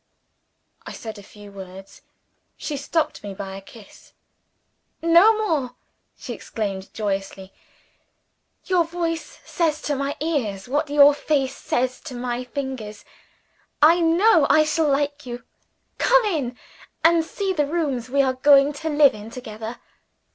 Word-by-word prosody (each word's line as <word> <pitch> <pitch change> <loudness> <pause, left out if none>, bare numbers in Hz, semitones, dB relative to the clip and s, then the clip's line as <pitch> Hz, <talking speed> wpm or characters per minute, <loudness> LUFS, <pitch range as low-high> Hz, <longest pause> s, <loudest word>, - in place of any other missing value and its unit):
I - - -8
said 220 -2 -8
a - - -10
few 205 0 -14
words. 190 0 -11 0.6
She 300 - -4
stopped 305 +2 -2
me 200 -1 -7
by 195 -1 -6
a 195 - -8
kiss. 205 +1 -16 0.9
"No 345 +7 +5
more!" 315 - -1 0.4
she - - -7
exclaimed 195 -4 -5
joyously. 195 -2 -4 1.1
"Your 365 -2 +3
voice 330 0 -4
says 315 -3 0
to 290 - -1
my 275 +1 -2
ears, 240 -12 -2
what 290 +3 -1
your 290 0 +7
face 275 -2 -1
says 255 +1 -2
to 265 -5 -7
my 245 0 -3
fingers. 250 -5 -6 0.7
I 325 +4 +6
know 335 0 +4
I 310 - +6
shall 310 0 +1
like 285 0 -1
you. 240 0 -6 0.6
Come - - +4
in, 280 - -2 0.5
and 330 0 +5
see 385 +4 -3
the 295 -5 0
rooms 280 -7 -2
we 275 +2 +3
are 260 -1 +1
going 280 +2 +5
to 320 +3 -4
live 295 -2 +5
in 215 +1 -9
together." 225 -1 -8
280 Hz, 140 wpm, -23 LUFS, 225-320 Hz, 1.1 s, your